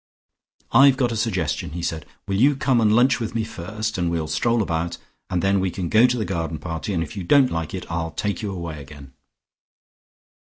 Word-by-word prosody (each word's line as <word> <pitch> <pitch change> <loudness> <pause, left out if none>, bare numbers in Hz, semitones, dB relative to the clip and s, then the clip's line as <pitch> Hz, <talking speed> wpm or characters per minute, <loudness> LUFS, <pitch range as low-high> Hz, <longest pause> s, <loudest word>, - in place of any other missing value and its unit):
"I've 135 +2 +6
got 125 -3 +1
a - - -2
suggestion," 95 - -1
he 85 0 -5
said. 80 -3 -3 0.2
"Will 95 - -1
you 140 +2 +5
come 130 -4 +2
and 105 -1 +4
lunch 125 +3 +4
with 115 -1 -4
me 115 - +1
first, 110 +2 -4
and 85 -1 +1
we'll 80 -2 -2
stroll 110 +9 +1
about, 85 -1 -2 0.3
and 90 - -1
then 100 0 +3
we 95 0 0
can 90 -1 -4
go 115 +3 +6
to 125 0 -1
the 110 - -1
garden 85 -4 -3
party, 80 +5 -5
and 85 -4 0
if 80 - -9
you 95 - -4
don't 135 +7 +4
like 80 +1 -3
it 95 - -6
I'll 85 -1 -2
take 100 +8 -3
you 105 -2 -3
away 85 -5 -6
again?" 70 -1 -13
95 Hz, 220 wpm, -23 LUFS, 80-115 Hz, 0.3 s, I've